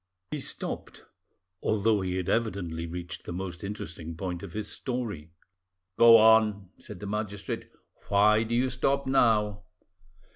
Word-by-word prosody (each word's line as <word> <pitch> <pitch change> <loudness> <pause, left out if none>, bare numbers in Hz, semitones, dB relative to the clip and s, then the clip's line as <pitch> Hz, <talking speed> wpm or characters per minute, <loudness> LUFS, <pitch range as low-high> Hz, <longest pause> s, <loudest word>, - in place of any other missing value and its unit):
He 150 - -2
stopped, - - -6 0.6
although 110 -1 +2
he 90 -1 -2
had 95 -1 -2
evidently 90 -7 -1
reached 90 +2 -7
the - - -7
most 90 0 -5
interesting 85 -5 -6
point 90 -2 -4
of 95 -4 -9
his 110 0 -4
story. 115 - -5 0.7
"Go 115 -1 +9
on," 110 -3 +4
said 105 -4 -10
the 105 - -7
magistrate; 105 -1 -4 0.4
"why 105 +2 +4
do 115 +1 -1
you 130 +2 +1
stop 135 +2 0
now?" 110 -6 +2
105 Hz, 140 wpm, -28 LUFS, 90-115 Hz, 0.7 s, Go